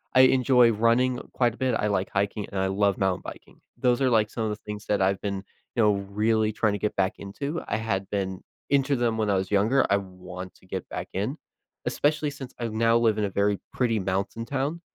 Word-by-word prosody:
I 130 - +8
enjoy 125 -2 +5
running 120 +3 +2
quite 120 -3 +2
a - - -15
bit, 130 -3 +1
I 105 - 0
like 95 -2 0
hiking, 100 +1 -1
and 95 - -2
I 95 - +1
love 100 0 +1
mountain 95 -2 0
biking. - - -10 0.2
Those 125 +1 +2
are, 130 - +4
like, 110 -2 +3
some 115 - -3
of 110 - 0
the 105 - -3
things 105 0 -8
that 105 -2 +1
I've 95 0 +2
been, 100 -1 -2 0.4
you 115 - +2
know, 105 -1 +5
really 105 +2 +1
trying 110 -1 +1
to 105 - -2
get 105 - -1
back 95 0 +2
into, 140 +11 -4
I 105 - 0
had 100 -3 -2
been 95 -2 -2 0.3
into 140 0 +3
them 115 -2 +1
when 110 -2 0
I 100 - +3
was 95 0 -1
younger, 110 +7 +3
I 100 - +4
want 90 -1 -8
to - - -22
get 95 -1 -5
back - - -5
in, - - -2 0.5
especially 150 0 +1
since 135 -2 -9
I 120 - -1
now 115 +1 +3
live 110 -2 +2
in 105 - 0
a - - -2
very 100 +1 +1 0.2
pretty 115 -4 +1
mountain 95 +4 -2
town, 145 +6 -2
105 Hz, 235 wpm, -26 LUFS, 100-120 Hz, 0.5 s, I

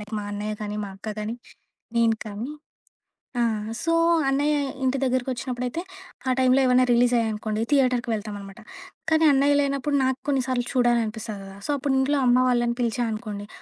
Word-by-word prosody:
Like 210 +1 -11
మా 205 - -5
అన్నయ్య 210 +1 -3
కాని, 210 0 -4
మా - - -6
అక్క 195 - -8
గాని, 215 +2 -3 0.6
నేను 230 -1 +3
కానీ, 215 +6 -5 0.9
ఆ! - - +3 0.4
సో 330 0 +1 0.4
అన్నయ్య 290 +2 +2 0.3
ఇంటి 260 +1 +1
దగ్గరికొచ్చినప్పుడైతే, 255 +2 -2 0.5
ఆ - - +4
టైంలో 260 +1 +4
ఏవైనా 255 0 +4
రిలీజ్ 240 +1 +4
అయ్యాయనుకోండి, 215 -1 -1
థియేటర్‌కి 255 -3 +2
వెళ్తామనమాట. 205 -2 -6 0.5
కానీ, 315 0 +4
అన్నయ్య 280 +1 +4
లేనప్పుడు, 280 +1 0
నాకు 260 0 0
కొన్ని 275 -2 +2
సార్లు 250 -2 0
చూడాల 240 -2 +3
అనిపిస్తది 215 -1 -6
కదా! 195 0 -10
సో - - 0
అప్పుడు, 275 0 -1
ఇంట్లో 285 +2 +2
అమ్మ 245 0 +5
వాళ్ళని 240 -1 +1
పిలిచా 240 +1 0
అనుకోండి, 210 -2 -5
245 Hz, 165 wpm, -25 LUFS, 215-265 Hz, 0.9 s, అమ్మ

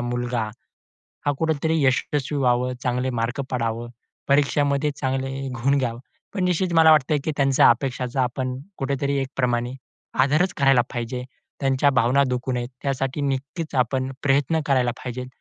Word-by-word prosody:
मुलगा 120 0 -2 0.8
हा 145 - +3
कुठेतरी 160 0 +1
यशस्वी 140 +2 0
व्हावं. 125 -1 +2
चांगले 125 +1 0
मार्क 115 +4 -2
पडावं. 115 -1 -2 0.4
परीक्षामध्ये 140 +1 +2
चांगले 135 0 -2 0.3
गुण 140 +2 +3
घ्यावं. 120 -3 -2 0.4
पण 190 - 0
निश्चित 180 0 +1
मला 160 -1 +7
वाटतंय, 150 0 +3
की - - 0
त्यांच्या 135 -2 +5
अपेक्षाचा 130 0 -1
आपण 125 +1 -2 0.2
कुठेतरी 140 +1 -1
एकप्रमाणे 125 -2 -1 0.5
आदरच 155 +7 +3
करायला 135 -2 +5
पाहिजे. 125 +1 -4 0.4
त्यांच्या 135 +1 +3
भावना 130 +1 +3
दुखवू 125 +1 -2
नये 120 -1 -2 0.2
त्यासाठी 135 0 -2
नक्कीच 140 +4 -3
आपण 130 +1 +1
प्रयत्न 145 +3 +2
करायला 130 -3 +2
पाहिजेत. 125 0 -5
135 Hz, 135 wpm, -23 LUFS, 125-140 Hz, 0.8 s, मला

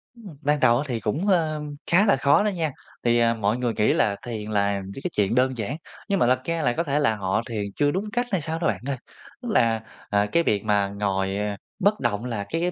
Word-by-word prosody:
Ừm, 195 -11 -12
ban 150 0 +1
đầu 120 -2 +5
á 140 - -1
thì 120 -3 -2
cũng, 155 - -2
ơ, 160 -5 +2 0.3
khá 195 +5 +5
là 135 - +5
khó 140 +9 +4
đó 210 - +2
nha. 165 -6 -1 0.3
Thì, 120 0 +3
à, 115 0 +4
mọi 110 +1 0
người 120 -2 -1
nghĩ 105 - +2
là 100 -2 +2
thiền 110 -3 -5
là 100 -1 +1
những 100 +8 -8
cái 180 - -2
chuyện 105 +3 +1
đơn 130 0 +2
giản, 115 +6 -3 0.3
nhưng 195 - +2
mà 120 - +4
thật 130 0 +3
ra 165 -1 -1
là 120 -4 +2
có 170 - 0
thể 145 -1 0
là 115 -7 +2
họ 100 +2 0
thiền 105 -3 -2
chưa 145 -1 +2
đúng 195 +4 -2
cách 245 0 +1
hay 185 -5 +1
sao 160 +2 -3
đó 165 - +1
bạn - - -1
ơi. 140 - -1 0.4
Tức 245 - -5
là, 115 - +3 0.3
à, 100 0 +2
cái 170 - +3
việc 105 -7 +1
mà 100 -2 +2
ngồi, 100 -1 -1
à, 105 -1 -2 0.2
bất 205 +2 +2
động 115 -1 -1
là 115 -5 -3
cái 175 +2 0
125 Hz, 260 wpm, -24 LUFS, 105-160 Hz, 0.4 s, đầu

